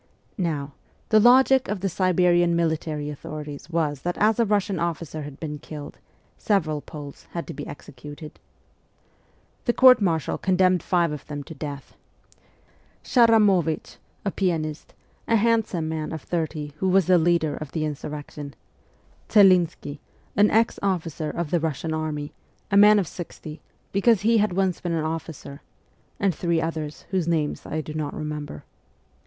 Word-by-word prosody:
Now, 150 -5 -2 0.4
the 215 - +6
logic 260 +3 +5
of 200 -2 -3
the 195 - 0
Siberian 175 -2 +3
military 160 -3 -1
authorities 150 0 -8
was 155 -5 -1
that 175 +3 -3
as 215 +2 +3
a 235 - +4
Kussian 200 -3 0
officer 165 -2 -3
had 145 -2 -9
bsen 150 -2 -5
killed 150 -2 -9 0.4
several 155 -8 0
Poles 145 -3 -10
had 170 - -3
to 165 - -7
be 145 - -7
executed. 145 +2 -10 1.3
The 240 - +2
court 255 -2 +7
martial 165 -6 0
con 185 -1 +1
demned 185 -1 +3
five 170 -2 +1
of 150 -2 -7
them 145 -1 -5
to 160 - -10
death: 140 -2 -7 1.1
Szaramowicz, 210 - +3 0.3
a 200 - 0
pianist, 160 -6 -2 0.3
a 230 - +3
handsome 220 -7 +1
man 160 -1 -3
of 160 - -6
thirty 155 -3 -3
who 190 +4 0
was 190 -1 +4
the 180 -1 +5
leader 160 -3 +2
of 155 -2 -7
the 155 -2 -1
in 150 - -1
surrection; 145 0 -8 0.8
Celinski, 180 -7 +4 0.4
an 205 +1 +5
ex 225 +1 +2
officer 165 -5 -2
of 170 -2 -4
the 175 - +3
Russian 160 0 -2
army, 155 -2 -3 0.4
a - - +2
man 210 +1 +8
of 195 -5 +1
sixty, 160 -3 -8 0.3
because 200 +1 +3
he 225 +2 +3
had 210 -3 +1
once 190 -1 0
been 175 -1 -2
an 160 -1 -1
officer; 155 -3 -6 0.6
and 195 -2 +2
three 170 +1 0
others 160 -2 -4
whose 185 -4 0
names 160 -3 -1
I 155 - -2
do 155 - -8
not 155 -2 -3
remember. 150 - -5
165 Hz, 160 wpm, -24 LUFS, 150-190 Hz, 1.3 s, man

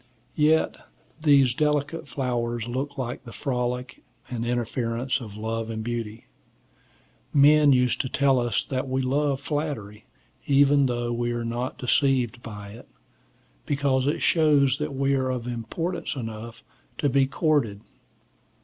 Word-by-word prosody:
Yet 155 +1 +3 0.4
these 140 -5 +5
delicate 150 +2 0
flowers 120 -4 -2
look 135 +4 -4
like 125 -2 -4
the 120 - -10
frolic 125 -2 -3 0.3
and 120 -2 -3
interference 120 +1 -1
of 105 -3 -9
love 115 +1 -3
and 110 -1 -4
beauty. 115 -1 -4 1.1
Men 145 +1 +6
used 125 -2 +3
to 130 - -4
tell 135 -1 +3
us 120 -1 0
that 130 0 -3
we 130 0 0
love 140 +1 +1
flattery, 140 -8 -4 0.4
even 140 0 +5
though 120 -1 -2
we 120 0 -1
are 120 0 -3
not 120 +2 -3
deceived 125 -2 +1
by 105 -3 -8
it, 110 +3 -12 0.8
because 135 -2 +1
it 145 - 0
shows 145 -5 +4
that 150 -2 -3
we 135 +1 +1
are 130 -1 +1
of 125 -2 -3
importance 125 +11 -3
enough 115 -1 -7 0.3
to 145 - +1
be 135 0 +3
courted. 135 - 0
130 Hz, 140 wpm, -25 LUFS, 120-140 Hz, 1.1 s, Men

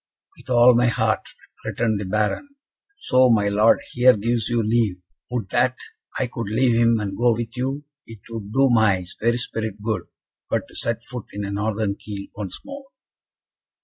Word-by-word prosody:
"With - - -17
all 125 0 +6
my 120 +1 +3
heart," 110 -4 0 0.3
returned 110 -3 -1
the 100 - -4
Baron, 105 - -1 0.5
"so 130 - +3
my 105 -3 +3
Lord 105 +2 +4
here 125 -1 +5
gives 115 +1 -1
you 120 -1 +1
leave: 110 -3 +1 0.3
would 120 -6 -3
that 130 +5 +2 0.4
I 130 - +1
could 115 -4 -5
leave 120 +3 +2
him 115 -1 +3
and 100 -2 -3
go 120 +1 +3
with 115 +1 -5
you. 135 +3 -2 0.2
It 115 -3 -12
would 105 -3 -6
do 135 +2 +3
my 100 -6 +3 0.2
very 120 +2 +2
spirit 110 -4 -3
good 105 -4 -3 0.4
but - - -1
to - - -16
set 115 0 -2
foot 125 -2 -4
in 100 0 -4
a 100 - -4
Northern 105 0 -1
keel 100 -1 -8
once 100 -3 -6
more." 280 -1 -9
115 Hz, 180 wpm, -22 LUFS, 105-120 Hz, 0.5 s, all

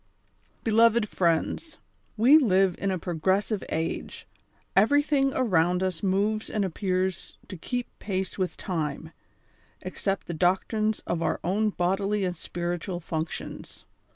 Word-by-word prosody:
ELOYED 225 0 +4
FRIEXDS 180 - 0 0.2
:— - - -40
We 290 +6 +8
live 190 - +3
in 195 - 0
a 190 - 0
progressive 190 +5 0
age— 160 +1 -3 0.5
everything 275 +5 +3
around 180 -7 +2
us 185 -3 -2
moves 205 +3 0
and 210 -2 0
appears 185 0 -2
to 190 - -6
keep 245 +8 -3
pace 190 -2 -3
with 185 -2 -2
time, 160 -4 -3 0.7
except 195 -1 -3
the 175 - -5
doctrines 200 +6 +1
of 170 -1 -2
our - - 0
own 210 +5 +1
bodily 195 +2 0
and 180 -1 -2
spiritual 175 +2 -4
functions. 160 -1 -6
190 Hz, 125 wpm, -27 LUFS, 175-215 Hz, 0.7 s, We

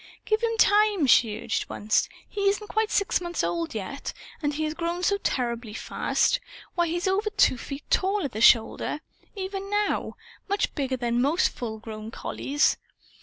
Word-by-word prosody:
"Give 430 +1 +1
him 455 -1 0
time!" 415 -5 +4
she 220 -4 +4
urged 225 - -2
once. 215 +1 +1 0.2
"He 400 -1 +1
isn't 415 +1 -2
quite 435 0 +1
six 400 -2 +1
months 345 - -2
old 170 +2 -2
yet; 220 +7 -5 0.3
and 290 -2 +1
he 305 +2 -2
has 305 0 -1
grown 340 +2 -3
so 400 +3 +3
terribly 235 - -2
fast. - - +1 0.3
Why, 345 -1 +1
he's 345 +3 -1
over 405 +3 +1
two 415 -10 +4
feet 275 +1 -7
tall, 390 -1 +2
at 275 - -3
the 215 - -4
shoulder, 235 +6 +4 0.3
even 390 0 -4
now 415 0 0 0.3
much 405 +1 0
bigger 265 -2 -1
than 240 -1 0
most 295 +7 +3
full 225 -3 -5
grown 215 0 -8
collies. 280 +5 0
315 Hz, 170 wpm, -26 LUFS, -, 0.3 s, time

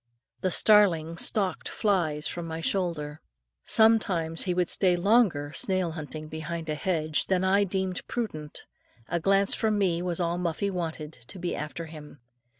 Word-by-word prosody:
The 185 - 0
starling 170 -4 +4
stalked 195 0 0
flies 165 -8 0
from 170 -1 -4
my 160 0 -5
shoulder. 165 -4 -2 0.4
Sometimes 195 -8 +3
he 180 - 0
would 180 -1 +1
stay 180 -1 +2
longer 175 -7 +2
snail 185 +4 +1
hunting, 155 -1 -7
behind 160 +1 -6
a - - 0
hedge, 155 -1 -1
than 185 -1 +1
I 200 +2 +3
deemed 190 -1 -3
prudent; 155 - -5 0.4
a 170 - 0
glance 195 +3 +3
from 215 -2 0
me 180 -4 +1
was 175 -1 -2
all 175 0 -1
Muffie 180 +3 -1
wanted, 165 -4 -4 0.2
to - - -10
be 175 -1 -3
after 150 +2 -5
him. 150 -2 -12
175 Hz, 155 wpm, -27 LUFS, 160-195 Hz, 0.4 s, starling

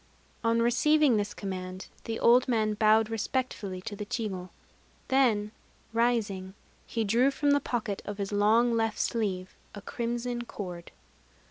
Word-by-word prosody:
On 230 0 +2
receiving 275 +2 +4
this 205 0 -1
command, 185 -1 -5 0.2
the 225 0 -3
old 245 +2 +5
man 220 -3 +1
bowed 215 +1 +4
respectfully 220 -4 -2
to 205 - -6
the 210 - -5
chigo: 205 -4 -4 0.6
then, 230 -6 +3 0.4
rising, 210 -5 0 0.3
he 230 - -1
drew 235 +6 +3
from 285 +1 +1
the 285 - +4
pocket 230 -6 -3
of 205 -1 -6
his 200 -1 -3
long 220 +4 +3
left 225 -1 0
sleeve 190 -5 -1 0.2
a 205 - -8
crimson 240 +1 -3
cord. 180 -7 -7
220 Hz, 140 wpm, -29 LUFS, 205-240 Hz, 0.6 s, old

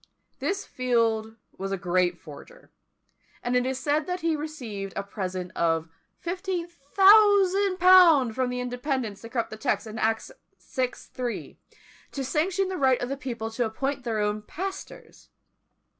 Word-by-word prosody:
This 395 0 -2
Field 225 -3 0 0.2
was 195 0 -3
a 195 - -1
great 180 -1 +1
forger; 170 - -14 0.7
and 245 +1 0
it 250 0 +2
is 265 0 -2
said 300 +2 0
that 360 0 -3
he 325 -1 +1
received 240 -11 -6
a 200 - -2
present 185 -3 -5
of 165 -1 0 0.4
1500_l._ 370 - +5
from 255 +1 0
the 250 0 -3
Independents 250 -4 -3
to 230 - -9
corrupt 230 -3 -2
a - - -7
text 220 - -1
in 220 0 -7
Acts 225 0 0 0.4
vi. 255 -1 +2
3, 245 -2 -6 0.5
to 275 - -3
sanction 360 +7 0
the 375 - -3
right 265 -4 +3
of 245 - -3
the 275 - -2
people 235 -5 -5
to 240 +2 -1
appoint 270 +5 -3
their 230 -3 -2
own 210 0 0
pastors. 380 - -8
255 Hz, 150 wpm, -26 LUFS, 220-340 Hz, 0.7 s, 1500_l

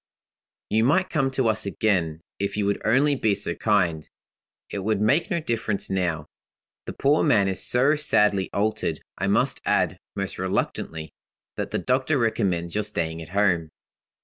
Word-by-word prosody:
"You 110 +1 +3
might 185 +9 +2
come 135 -5 +1
to 130 -2 0
us 110 -2 -1
again, 90 -6 0 0.2
if 100 +1 -2
you 105 - 0
would 100 0 -1
only 135 +7 +3
be 110 -6 +1
so - - -1
kind. 80 -2 0 0.6
It 100 - -3
would 105 +1 0
make 135 - +2
no 170 -4 0
difference 115 -10 -2
now; 85 -5 -1 0.6
the - - -4
poor 145 +3 +2
man 105 -10 +3
is 95 -1 -1
so 135 +5 +4
sadly 105 -10 +2
altered. 105 -6 -1 0.2
I - - 0
must - - +1
add, - - +1 0.2
most 100 -2 -4
reluctantly, 80 -4 -3 0.4
that - - -3
the - - -2
doctor 130 +4 +1
recommends 100 -8 0
your 105 - 0
staying 85 -6 -2
at 80 - -10
home. 90 -4 +1
105 Hz, 165 wpm, -24 LUFS, 95-125 Hz, 0.6 s, so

